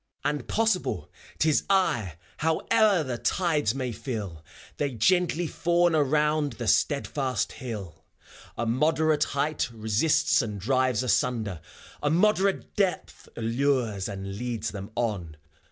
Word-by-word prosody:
And 145 -3 -1
possible 225 -4 0 0.3
't 160 - +2
is 150 - +2
I 125 - +2
— - - -30
Howe'er 195 +4 +2
the 125 -4 -4
tides 150 - +1
may 130 -2 -2
fill, 105 - -5 0.3
They 145 -2 -1
gently 175 - +2
fawn 175 +1 +2
around 150 0 +2
the 120 - -6
steadfast 130 +2 +1
hill; 100 - -7 0.5
A 120 - -1
moderate 150 +5 +2
height 145 +1 -1
resists 120 +9 +2
and 105 -4 -5
drives 130 +2 +1
asunder, 110 -6 0 0.4
A 145 - +1
moderate 195 +3 +2
depth 195 -3 -2
allures 115 -4 0
and 100 0 -6
leads 115 -3 -3
them 100 0 -7
on. 100 -10 -2
130 Hz, 125 wpm, -27 LUFS, 110-155 Hz, 0.5 s, t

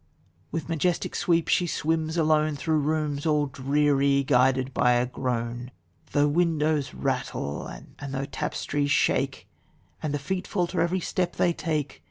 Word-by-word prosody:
with 160 -1 -3
majestic 165 +1 0
sweep 170 -4 +2
she 175 - +2
swims 160 0 -1
alone 155 -1 +3
Through 155 +2 0
rooms, 150 0 -1
all 150 -1 +3
dreary, 140 0 +2
guided 130 0 +2
by 125 0 +3
a 120 0 +2
groan, 120 -1 -3 0.4
Though 145 0 +3
windows 155 -2 +1
rattle 125 - -2
and - - -11 0.2
though 135 0 -2
tap'stries 145 +1 -2
shake - - +1 0.5
And 155 - -2
the 145 - 0
feet 180 +7 -3
falter 180 -2 0
every 175 +2 +1
step 180 +1 -1
they 175 - +2
take. 155 -4 -3
150 Hz, 145 wpm, -26 LUFS, 135-165 Hz, 0.5 s, alone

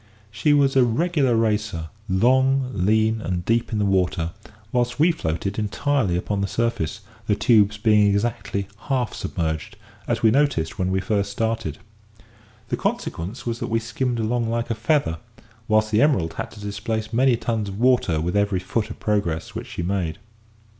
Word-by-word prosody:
She 110 +8 +1
was 140 -2 +4
a 130 - +6
regular 135 +1 +2
racer 105 -7 0 0.2
long, 130 +6 +3
lean, 110 +3 +2
and 90 -4 -3
deep 115 +1 +1
in 110 - -1
the 105 - +1
water; 90 -3 +1 0.4
whilst 125 0 0
we 165 +3 +5
floated 95 - -3
entirely 110 -2 0
upon 100 +2 -2
the 100 - 0
surface, 110 -5 -1 0.3
the 105 - +3
tubes 105 -1 +4
being 105 -1 +4
exactly 100 -1 -1 0.2
half 130 -4 0
submerged, 85 +5 -3 0.3
as 120 -1 -1
we 110 - +6
noticed 135 - +1
when 90 0 +1
we 95 0 0
first 100 0 -1
started. 110 -7 -2 0.9
The - - -1
consequence 95 +9 -3
was 115 -1 -2
that - - -3
we 115 - +2
skimmed 120 +2 -2
along 115 +1 0
like 115 +1 -1
a - - +3
feather, 115 - +1 0.5
whilst 110 0 +2
the 110 - +3
Emerald 130 - +2
had - - -5
to - - -12
displace 105 +2 -4
many 125 0 +4
tons 110 -3 -2
of 100 +1 -7
water 120 -10 +3
with 85 +5 -2
every 100 -2 +2
foot 105 +4 -2
of - - -8
progress 95 -7 -1
which - - -6
she 85 - -5
made. 90 -3 -1
110 Hz, 175 wpm, -23 LUFS, 95-120 Hz, 0.9 s, a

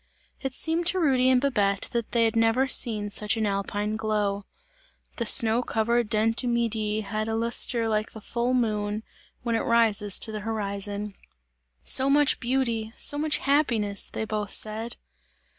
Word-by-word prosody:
It 270 -1 -5
seemed 330 +1 -1
to 370 +1 +2
Rudy 260 -6 +2
and 255 -1 +4
Babette, 205 -8 0
that 235 -2 -3
they 235 -1 +2
had 225 - -1
never 230 +4 +2
seen 215 -5 +1
such 210 +2 -1
an 220 - -1
alpine 205 +1 -2
glow. 210 -2 -2 0.7
The 235 - -1
snow 230 +1 +4
covered 235 -1 -1
Dent 225 +2 +1
du 250 - +1
Midi, 220 -3 -1
had 215 +1 -4
a 225 - -2
lustre 230 0 +2
like 215 -1 -2
the 220 - -9
full 240 +4 -2
moon, 215 -3 -1 0.4
when 235 -1 -2
it - - +1
rises 220 -4 +2
to 220 - -1
the 215 - -5
horizon. 205 -1 -3 0.7
"So 265 +1 +4
much 290 0 +3
beauty, 235 -3 -2
so 290 - +4
much 305 0 +1
happiness!" 235 -9 +1
they 220 - -4
both 210 -2 -4
said. 220 +2 -3
225 Hz, 165 wpm, -25 LUFS, 210-240 Hz, 0.7 s, and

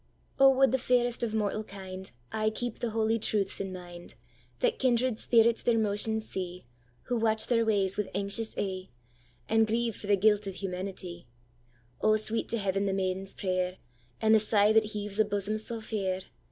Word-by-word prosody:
'O 270 0 +8
would 270 0 +5
the 265 - +1
fairest 245 -1 +1
of 225 -2 -1
mortal 215 0 0
kindAye 190 - -5
keep 240 -2 -3
the 240 - -1
holy 225 +1 +1
truths 205 -2 0
in 195 -1 -3
mind, 175 -1 -10 0.4
That - - 0
kindred 250 -2 +2
spirits 230 -1 +3
their 235 -1 +2
motions 220 +1 0
see, 180 -4 -5 0.4
Who 245 - -1
watch 220 -1 +2
their 230 -2 +2
ways 200 -3 +1
with 210 - -1
anxious 200 +3 -1
e'e, 190 -2 -3 0.6
And 225 0 +3
grieve 230 0 0
for 205 - -9
the 205 -1 +4
guilt 210 +1 +3
of 195 - -5
humanitye!O, 170 - -5
sweet 215 +1 -1
to 230 - 0
Heaven 195 -1 0
the 195 - 0
maiden's 190 0 -2
prayer, 185 -1 -1 0.4
And 220 0 +4
the 220 - +7
sigh 210 0 +3
that 220 0 +5
heaves 210 -1 -5
a - - +7
bosom 205 0 -2
sae 225 +1 -3
fair! 195 -4 -2
210 Hz, 175 wpm, -29 LUFS, 190-225 Hz, 0.6 s, O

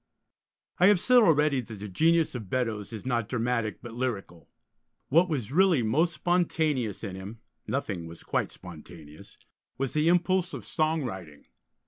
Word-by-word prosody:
I 180 - +6
have 205 -3 +5
said 250 +6 +5
already 150 - +3
that 110 -2 -9
the 105 +1 -7
genius 165 - +2
of 110 -7 -7
Beddoes 115 -4 -2
is 110 0 -8
not 120 -4 -1
dramatic, 115 -3 -1
but 120 - -8
lyrical. 110 -9 -4 0.6
What 170 +6 +4
was 130 -7 -3
really 175 -5 +4
most 160 +10 +1
spontaneous 155 - 0
in 95 - -5
him 95 +4 -8 0.3
(nothing 100 -11 -3
was 85 0 -12
quite - - -1
spontaneous) 80 -3 -13 0.4
was 135 -1 -2
the 155 +1 +1
impulse 180 +1 +2
of - - -8
song 155 -1 0
writing. 90 - -8
125 Hz, 155 wpm, -27 LUFS, 105-160 Hz, 0.6 s, I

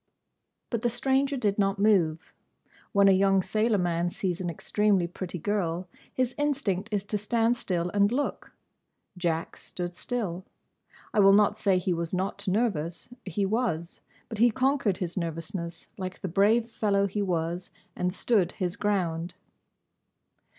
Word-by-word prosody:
But 235 -3 -1
the 240 - +2
stranger 270 +3 +1
did 205 -4 0
not 195 0 +2
move. 180 -5 +2 0.6
When 200 -1 +5
a - - +7
young 195 0 +4
sailor 215 +2 +1
man 175 -1 0
sees 180 0 -2
an 175 - -2
extremely 200 +3 +1
pretty 180 +1 -6
girl, 180 -1 -1 0.2
his 255 -1 0
instinct 230 -9 -1
is 205 -2 0
to 210 0 -1
stand 230 +3 +2
still 180 -6 -2
and 200 +1 +3
look. 285 +4 -2 0.6
Jack 170 -2 -2
stood 175 -1 -6
still. 190 -6 -3 0.7
I - - +2
will 195 -1 +7
not 205 0 +4
say 195 -2 +2
he 180 0 0
was 170 +1 -2
not 190 +3 -3
nervous. 185 -5 -1 0.2
He 195 +1 -1
was. 195 -6 -1 0.3
But 220 -3 -7
he 240 +2 +6
conquered 255 -5 +1
his 180 0 -4
nervousness, 170 0 -4
like 185 -1 -5
the - - -2
brave 205 +6 +3
fellow 205 -3 +1
he 200 +1 -2
was, 175 -1 -2 0.3
and 180 0 0
stood 190 -2 +1
his 180 -3 -2
ground. 175 -4 -1
195 Hz, 150 wpm, -28 LUFS, 175-215 Hz, 0.7 s, a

